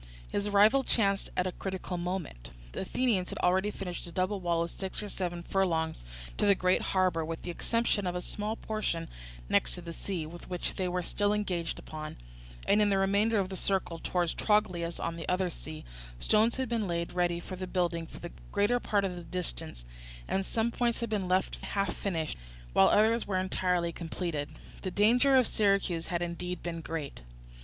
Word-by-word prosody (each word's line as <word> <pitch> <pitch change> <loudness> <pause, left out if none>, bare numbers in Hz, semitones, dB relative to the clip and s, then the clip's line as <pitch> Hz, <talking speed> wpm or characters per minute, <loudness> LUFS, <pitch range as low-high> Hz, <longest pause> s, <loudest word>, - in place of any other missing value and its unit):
His 205 0 -1
arrival 210 +7 +5
chanced 200 -6 +2
at 180 - +2
a 185 - 0
critical 190 0 -4
moment. 175 - -4 0.2
The - - -5
Athenians 200 -2 +1
had - - -5
already 190 +3 +3
finished 180 -4 -5
a - - -9
double 185 +3 0
wall 170 -2 +1
of 170 - -5
six 190 +2 -5
or 205 - -5
seven 175 -3 -3
furlongs 165 -4 0 0.4
to - - +3
the 200 - +6
great 185 0 +3
harbour, 185 -4 +2
with 160 +1 -5
the 175 - -3
exception 230 +1 0
of 180 - -1
a 180 - -1
small 210 +1 -2
portion 215 -8 -2 0.4
next - - +2
the 170 -1 -7
sea, 175 -2 -3
which 175 +2 -4
they 185 -2 -1
were 180 0 -1
still 205 +4 +1
engaged 180 -5 -1
upon; 155 -1 -7 0.5
and 210 - +5
in 205 - +4
the 195 - +3
remainder 200 +3 +3
of 190 -2 +1
the 190 - -5
circle 185 -3 0
towards 175 -1 0
Trogilus 180 -5 +1
on 170 0 -2
the 165 - -5
other 180 0 +1
sea, 155 -1 -7 0.3
stones 220 - +4
had 260 0 -1
been 225 -3 0
laid 170 -1 -2
ready 175 -1 +1
for 185 +2 -7
building 170 -3 0
for - - -11
the 175 - -7 0.2
greater 205 +4 +3
part 205 -4 +1
of 185 -2 -2
the 175 - -7
distance, 165 - -4 0.4
and 195 - +1
some 225 +4 0
points 235 -1 0
had 230 -2 -2
been 200 -4 0
left 185 +1 +1
half 195 -3 -1
finished, 165 - -2 0.3
while 95 - +7
others 220 +2 +4
were 190 -2 0
entirely 180 -2 +1
completed. 165 -3 -3 0.3
The 185 - -2
danger 245 +8 +5
of 255 -2 +6
Syracuse 195 -6 +1
had 175 -1 -1
indeed 175 +1 -4
been 170 -1 -3
great. 160 - -5
185 Hz, 190 wpm, -31 LUFS, 170-205 Hz, 0.5 s, while